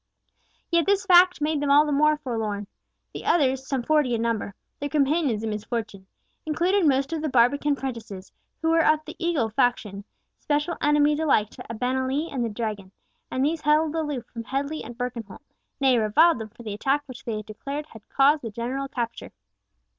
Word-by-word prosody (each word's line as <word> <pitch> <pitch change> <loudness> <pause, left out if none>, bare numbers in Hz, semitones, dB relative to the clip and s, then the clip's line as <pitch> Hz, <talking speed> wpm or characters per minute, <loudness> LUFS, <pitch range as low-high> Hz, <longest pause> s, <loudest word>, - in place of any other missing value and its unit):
Yet 340 0 +2
this 400 -1 +2
fact 365 -2 +6
made 300 -1 0
them 290 - 0
all 290 +2 +6
the 300 - -2
more 305 +2 +3
forlorn. 220 -7 -3 0.5
The - - -7
others, 265 -4 +1
some 265 -3 -1
forty 295 -4 +2
in 230 - -2
number, 220 -4 -2 0.2
their 285 - -3
companions 280 -5 +1
in 220 - -2
misfortune, 210 -2 -5 0.4
included 345 +4 +1
most 275 +2 +1
of 320 - -2
the 310 - -1
Barbican 280 +4 +3
prentices, 230 -8 -7 0.3
who 325 - +2
were 330 0 +4
of 310 0 +2
the 315 - -9
Eagle 315 -10 +1
faction, 210 -4 0 0.4
special 295 +3 -1
enemies 295 0 +3
alike 245 -9 +2
to - - -10
Abenali 260 +6 -1
and 260 - -2
to 235 - 0
the 210 - -10
Dragon, 210 -5 -4 0.4
and 260 +1 0
these 315 +1 -1
held 300 +1 +2
aloof 295 -6 -3
from 230 -1 -8
Headley 280 +5 -3
and 240 - -10
Birkenholt, 245 -2 -6 0.4
nay, 260 -3 +4
reviled 240 +8 +4
them 220 -1 -6
for 235 +2 -14
the 215 -2 -5
attack 275 +8 0
which 260 0 -11
they 215 -3 -4
declared 275 +8 -6
had 225 -7 -16
caused 285 +2 +4
the 230 - -5
general 245 +5 -4
capture. 235 -3 -5
270 Hz, 185 wpm, -25 LUFS, 230-300 Hz, 0.5 s, fact